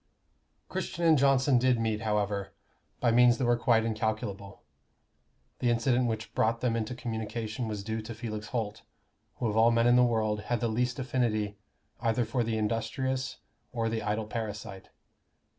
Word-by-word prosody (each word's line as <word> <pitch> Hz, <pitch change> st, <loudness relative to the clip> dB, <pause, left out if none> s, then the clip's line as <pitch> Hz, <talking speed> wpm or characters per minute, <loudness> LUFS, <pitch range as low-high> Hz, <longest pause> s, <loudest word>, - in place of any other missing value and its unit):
_ -, -, -46 dB
Christian 170 Hz, -, -3 dB
and 160 Hz, -1 st, +6 dB
Johnson 135 Hz, -2 st, +4 dB
did 125 Hz, -1 st, +3 dB
meet, 110 Hz, -1 st, -1 dB
however, 105 Hz, -2 st, -1 dB, 0.5 s
by 120 Hz, -, +3 dB
means 120 Hz, 0 st, +6 dB
that 130 Hz, -, 0 dB
were 120 Hz, 0 st, +4 dB
quite 120 Hz, -2 st, +2 dB
incalculable. 110 Hz, -3 st, -3 dB, 1.0 s
The 125 Hz, -, +1 dB
incident 120 Hz, +1 st, +2 dB
which 110 Hz, 0 st, -4 dB
brought 115 Hz, +1 st, +1 dB
them 120 Hz, -2 st, 0 dB
into 115 Hz, +2 st, -2 dB
communication 110 Hz, -1 st, -4 dB
was 105 Hz, -2 st, -4 dB
due 110 Hz, +1 st, -3 dB
to 110 Hz, +1 st, -7 dB
Felix 110 Hz, -2 st, -5 dB
Holt, 110 Hz, -4 st, -3 dB, 0.5 s
who -, -, -4 dB
of 105 Hz, -2 st, 0 dB
all 115 Hz, +1 st, +6 dB
men 115 Hz, 0 st, +3 dB
in 120 Hz, +1 st, +6 dB
the 125 Hz, -, +6 dB
world 110 Hz, -3 st, +1 dB
had 120 Hz, -1 st, +1 dB
the 115 Hz, -, 0 dB
least 125 Hz, +2 st, 0 dB
affinity 110 Hz, -6 st, -1 dB, 0.4 s
either 115 Hz, 0 st, +1 dB
for 120 Hz, +2 st, 0 dB
the 115 Hz, -1 st, -1 dB
industrious 130 Hz, +4 st, -2 dB, 0.3 s
or 115 Hz, -2 st, -1 dB
the 110 Hz, 0 st, -2 dB
idle 105 Hz, +1 st, -1 dB
parasite. 105 Hz, -3 st, -6 dB
115 Hz, 170 wpm, -29 LUFS, 110-125 Hz, 1.0 s, and